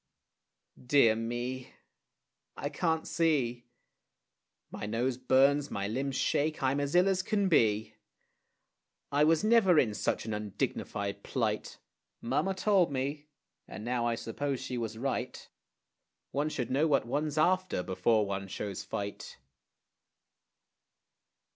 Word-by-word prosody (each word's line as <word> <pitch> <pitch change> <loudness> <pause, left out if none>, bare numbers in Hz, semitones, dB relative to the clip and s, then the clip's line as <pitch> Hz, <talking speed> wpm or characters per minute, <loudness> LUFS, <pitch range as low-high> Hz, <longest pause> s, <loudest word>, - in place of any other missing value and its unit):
Dear 125 -4 +5
me! 120 +3 -4 0.8
I 145 - -3
can't 160 +1 -1
see. 130 -8 0 1.0
My 105 - -5
nose 120 +4 0
burns, 135 +3 +3
my 100 -4 -3
limbs 135 +5 -2
shake, 155 +2 0
I'm 135 +2 +2
as 145 +3 -2
ill 180 +2 +5
as 190 -1 +2
can 200 0 0
be. 110 - +2 1.2
I 145 +1 +3
was 160 +2 +3
never 215 -6 +5
in 115 -7 +3
such - - -1
an 110 - -3
undignified 100 -1 -3
plight. - - -2 0.4
Mamma 145 +11 0
told 190 -4 +3
me, 140 +3 -3 0.4
and 105 - -8
now 120 -1 0
I 115 - +1
suppose 135 +4 -3
she 130 -1 -5
was 115 -2 -4
right; 135 +3 -3 0.8
One 145 +2 0
should 125 -6 -3
know 145 +5 +3
what 140 -6 +2
one's 150 +4 -2
after 185 - +2
before 105 +4 +2
one 95 -1 -4
shows 100 0 -5
fight. 100 0 -6
130 Hz, 125 wpm, -30 LUFS, 115-155 Hz, 1.2 s, Dear